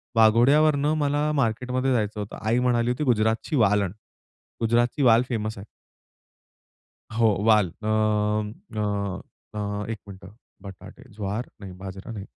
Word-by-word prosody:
वाघोड्यावरनं 140 +7 +4
मला 145 0 0
मार्केटमध्ये 125 +1 0
जायचं 105 -2 -1
होतं. 105 0 -6
आई 110 +3 +1
म्हणाली 120 -1 +1
होती, 125 +5 -2
"गुजरातची 115 +3 +1
वाल 105 -5 +3
आण." 95 -3 -2 0.7
गुजरातची 120 +5 +1
वाल 115 -2 +6
फेमस 110 -3 -3
आहे. 100 - -9 1.5
हो 115 -1 +4 0.2
वाल. 105 -5 +4
अ, - - -2 0.9
अ, 100 -2 -2 0.3
अ, 105 -1 -3
एक 115 -2 -4
मिनिटं 95 0 -12 0.3
बटाटे, 95 +5 -12
ज्वार 105 +3 -4
नाही 95 -1 -8
बाजरा 95 +3 -8
नाही. 100 -3 -7
110 Hz, 130 wpm, -25 LUFS, 105-125 Hz, 1.5 s, वाल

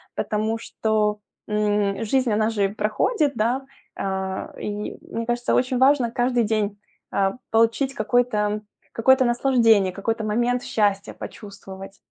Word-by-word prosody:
потому 215 +1 -1
что, 215 -2 -1 0.3
м, 210 -1 0
жизнь, 255 +1 +1
она 215 +1 +2
же 205 -3 +1
проходит, 215 - 0
да. 245 +5 0 0.3
А, 190 -1 -3
и 210 0 -4
мне 230 - -5
кажется, 240 0 0
очень 255 0 +1
важно 260 -3 +4
каждый 245 0 +1
день, 210 -2 -1 0.3
э, 195 -1 +2 0.2
получить 230 +4 +2
какой-то, 215 -3 +1 0.3
какое-то 260 +3 +4
наслаждение, 235 -5 +3
какой-то 220 +4 -2
момент 240 +3 0
счастья 200 -2 0
почувствовать. 195 -1 -10
220 Hz, 125 wpm, -23 LUFS, 205-245 Hz, 0.3 s, важно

